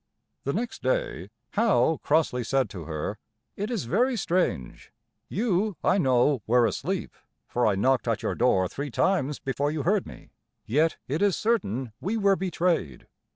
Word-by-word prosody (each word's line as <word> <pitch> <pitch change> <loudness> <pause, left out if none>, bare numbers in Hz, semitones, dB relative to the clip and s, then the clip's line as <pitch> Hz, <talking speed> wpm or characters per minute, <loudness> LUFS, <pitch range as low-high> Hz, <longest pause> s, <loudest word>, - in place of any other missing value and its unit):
The 140 - 0
next 235 +5 -3
day - - -1 0.2
Howe 205 -7 +2
crossly 145 -5 +1
said 130 -1 0
to 85 -5 -7
her: 80 +6 -4 0.4
"It 205 +2 -3
is 235 -6 -2
very 245 - +1
strange; 175 - -1 0.4
you, 205 -2 0
I 200 - +3
know, 130 - +3
were 120 +1 +4
asleep, 105 - -2 0.3
for 120 -1 +1
I 105 - +2
knocked 130 +6 +2
at 115 -2 0
your - - 0
door 95 -7 +2
three 140 +9 -5
times 150 +1 +1
before 135 +2 -1
you 150 -1 -2
heard 200 +2 +1
me; - - -13 0.3
yet 155 +7 +2
it 150 +7 -2
is 205 -3 +3
certain 130 - -1
we 210 +5 -1
were 200 -2 +4
betrayed. 175 - -1
150 Hz, 160 wpm, -26 LUFS, 120-195 Hz, 0.4 s, were